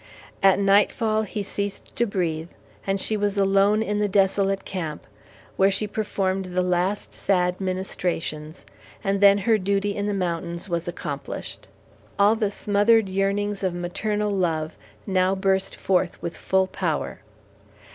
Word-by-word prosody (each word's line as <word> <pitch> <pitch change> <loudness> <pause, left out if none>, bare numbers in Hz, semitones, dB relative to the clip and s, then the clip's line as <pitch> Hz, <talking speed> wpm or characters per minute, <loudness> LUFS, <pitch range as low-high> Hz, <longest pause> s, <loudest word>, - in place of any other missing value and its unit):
At 195 -1 +6
nightfall 210 +2 +3
he 210 0 -4
ceased 200 0 -5
to 235 - +1
breathe, 170 -4 -2 0.4
and 195 0 +1
she 215 - 0
was 205 -1 -1
alone 200 +2 +3
in 210 -1 -1
the 210 - +2
desolate 195 0 +1
camp, 160 -6 -5 0.5
where 195 +1 +5
she 200 +2 0
performed 195 -3 -1
the 185 0 -1
last 180 +3 0
sad 180 -1 0
ministrations, 180 -4 -3 0.4
and 195 -1 0
then 200 0 +7
her 215 +2 +2
duty 200 +1 0
in 205 0 -2
the 205 - -1
mountains 170 -1 -3
was 170 -2 -2
accomplished. 175 - -6 0.5
All 205 +2 +5
the 215 -3 0
smothered 205 +1 +2
yearnings 200 +1 0
of 185 -3 -1
maternal 210 +4 -2
love 165 -5 -1 0.3
now 190 -1 +2
burst 190 0 0
forth 185 -2 0
with 170 - -5
full 190 0 +1
power. 175 -5 -3
195 Hz, 145 wpm, -24 LUFS, 180-205 Hz, 0.5 s, then